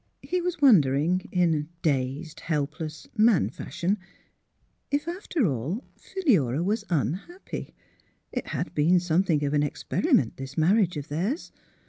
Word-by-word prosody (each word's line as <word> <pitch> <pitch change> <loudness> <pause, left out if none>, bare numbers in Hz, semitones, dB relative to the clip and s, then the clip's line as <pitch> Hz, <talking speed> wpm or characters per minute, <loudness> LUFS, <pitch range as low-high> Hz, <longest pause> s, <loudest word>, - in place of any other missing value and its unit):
He 365 0 -1
was 355 -2 -2
wondering, 175 - +4
in 165 -4 +1
dazed, 145 +2 -1
helpless 155 0 -3
man 215 - +4
fashion, 190 +9 -2 0.9
if, 290 +2 -1
after 345 - -1
all, 150 - -2
Philura 175 - +1
was 210 +4 0
un 155 -4 +1
happy. 355 +2 -8 0.6
It - - -4
had - - -3
been 170 +5 +4
something 170 -3 +1
of 140 - -1
an 145 - +3
experiment, 150 - +1
this 135 +3 -8
marriage 180 +1 +3
of 145 - -6
theirs. 190 - -2
170 Hz, 130 wpm, -26 LUFS, 145-225 Hz, 0.9 s, wondering